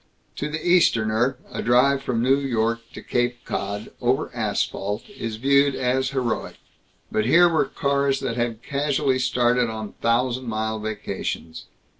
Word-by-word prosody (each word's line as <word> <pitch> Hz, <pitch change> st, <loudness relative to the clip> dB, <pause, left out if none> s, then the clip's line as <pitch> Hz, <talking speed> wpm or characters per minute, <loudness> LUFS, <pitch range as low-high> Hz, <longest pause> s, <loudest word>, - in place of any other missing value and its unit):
To 150 Hz, -, -2 dB
the 155 Hz, +3 st, -4 dB
Easterner, 120 Hz, -7 st, +3 dB
a -, -, -4 dB
drive 130 Hz, +3 st, +3 dB
from 120 Hz, -4 st, -1 dB
New 135 Hz, +2 st, +4 dB
York 115 Hz, -4 st, 0 dB
to -, -, -9 dB
Cape 120 Hz, 0 st, -1 dB
Cod, 100 Hz, +2 st, -4 dB
over 130 Hz, +4 st, +1 dB
asphalt, 105 Hz, -2 st, -2 dB
is 115 Hz, -, -5 dB
viewed 140 Hz, +3 st, +3 dB
as 130 Hz, +1 st, 0 dB
heroic, 130 Hz, -4 st, -2 dB, 0.6 s
but 110 Hz, -, +1 dB
here 175 Hz, +6 st, +6 dB
were 165 Hz, -4 st, +2 dB
cars 140 Hz, 0 st, 0 dB
that 125 Hz, -4 st, -2 dB
had 120 Hz, -1 st, -2 dB
casually 140 Hz, -1 st, 0 dB
started 125 Hz, -1 st, +2 dB
on 110 Hz, -2 st, -6 dB
thousand 125 Hz, +2 st, +1 dB
mile 110 Hz, 0 st, -2 dB
vacations. 105 Hz, -6 st, -5 dB
125 Hz, 145 wpm, -23 LUFS, 110-135 Hz, 0.6 s, here